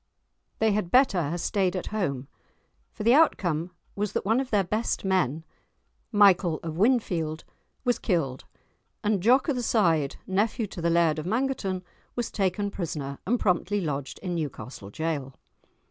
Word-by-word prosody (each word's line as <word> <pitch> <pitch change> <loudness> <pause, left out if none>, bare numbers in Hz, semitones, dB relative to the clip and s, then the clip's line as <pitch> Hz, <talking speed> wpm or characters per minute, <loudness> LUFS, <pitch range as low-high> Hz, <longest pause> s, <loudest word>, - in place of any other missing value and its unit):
"They 220 0 +3
had 200 -4 -1
better 200 - +3
hae 170 - -2
staid 190 +1 0
at 185 - -3
home," 140 -11 -2 0.6
for 210 - -7
the 235 +3 +5
outcome 175 - +3 0.3
was 205 0 -2
that - - -2
one 225 +5 +3
of 265 -1 -3
their 205 -3 +3
best 215 +3 -1
men, 165 -5 +1 0.7
Michael 190 -6 +4
of 160 -2 -4
Winfield, 175 -7 +1 0.4
was 245 -1 +2
killed, 150 - -1 0.6
and 210 -3 +1
Jock 250 +6 +4
o' 295 - +2
the 250 - -2
Side, 165 - +2
nephew 210 +4 0
to 185 -3 -8
the 170 - +1
Laird 165 -2 +3
of 155 - -5
Mangerton, 220 -5 -1 0.3
was 240 -2 -2
taken 200 +1 0
prisoner, 145 -7 -4
and 240 +3 +2
promptly 185 +2 +1
lodged 145 -6 -3
in 180 -2 -2
Newcastle 130 - -5
Jail. 140 0 -3
185 Hz, 160 wpm, -27 LUFS, 160-215 Hz, 0.7 s, the